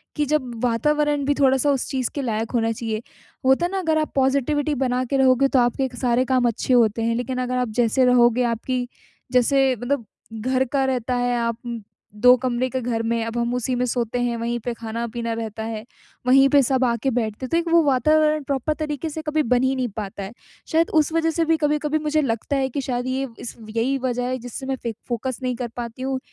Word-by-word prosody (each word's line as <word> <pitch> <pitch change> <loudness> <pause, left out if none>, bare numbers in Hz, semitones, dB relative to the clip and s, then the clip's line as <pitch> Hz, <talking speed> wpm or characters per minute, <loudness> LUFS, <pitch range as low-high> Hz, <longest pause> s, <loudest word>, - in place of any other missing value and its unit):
कि 300 - +1
जब 285 -4 0
वातावरण 295 +5 +1
भी 290 - +2
थोड़ा-सा 270 +1 +3
उस 270 -2 -1
चीज़ 260 -3 -1
के 285 - -1
लायक 225 -3 -2
होना 225 -2 +1
चाहिए, 225 -1 -3 0.5
वो 260 - +5
होता 340 +6 +3
ना 385 +2 -3
अगर 320 -4 +1
आप 310 -1 -1
पॉज़िटिविटी 280 +2 +1
बना 255 -1 0
के 275 +3 -1
रहोगे 265 0 +4
तो 270 - +2
आपके 245 +2 +1
क 250 - -12
सारे 250 0 +2
काम 255 -2 +2
अच्छे 235 +2 0
होते 230 -2 +3
हैं, 230 0 +1
लेकिन 250 +2 -3
अगर 250 0 -1
आप 250 0 0
जैसे 240 +2 +3
रहोगे 245 0 +4
आपकी 245 +2 -1 0.4
जैसे 260 +1 +3
मतलब 245 +1 -2 0.3
घर 255 +3 +1
का 275 -1 +2
रहता 255 -1 -1
है 245 0 +1
आप 230 -1 -1
उ, 235 -1 -4 0.4
2 250 +4 +6
कमरे 250 0 0
के 260 - -2
घर 230 -1 -1
में 230 0 0
अब 230 +1 -4
हम 235 0 0
उसी 250 +1 -1
में 250 0 0
सोते 245 -1 -1
हैं, 240 -1 0
वहीं 235 +1 -2
पे 245 - -1
खाना-पीना 230 +1 -4
रहता 220 -1 -5
है, 220 -1 -5 0.4
वहीं 270 +2 +6
पे 285 +1 +5
सब 260 +1 +1
आ 235 -1 +2
के 270 - +2
बैठते 225 0 -2
हैं, - - -7
तो 335 - +2
एक 340 - 0
वो 335 - +7
वातावरण 305 +2 +3
प्रॉपर 275 +2 -1
तरीके 305 0 -3
से 315 +1 -5
कभी 305 0 0
बन 250 +2 +2
ही 260 +1 +2
नहीं 255 -2 -1
पाता 200 -1 -5
है। 195 - -7 0.4
शायद 330 +1 +3
उस 310 0 +3
वजह 325 0 +2
से 330 +1 0
भी 325 0 +2
कभी-कभी 300 0 0
मुझे 305 0 +1
लगता 235 +1 -1
है 265 -1 0
कि 275 +2 -3
शायद 245 -1 -2
ये 265 +1 -1
इस 240 - -7
यही 230 +5 0
वजह 250 -1 -1
है 255 +1 -1
जिससे 245 +2 -7
मैं 270 0 -1
फे 230 -2 -2
फोकस 250 0 -3
नहीं 250 -1 -1
कर 240 0 -4
पाती 235 +1 -6
हूँ 265 0 -1
255 Hz, 230 wpm, -22 LUFS, 235-275 Hz, 0.5 s, वो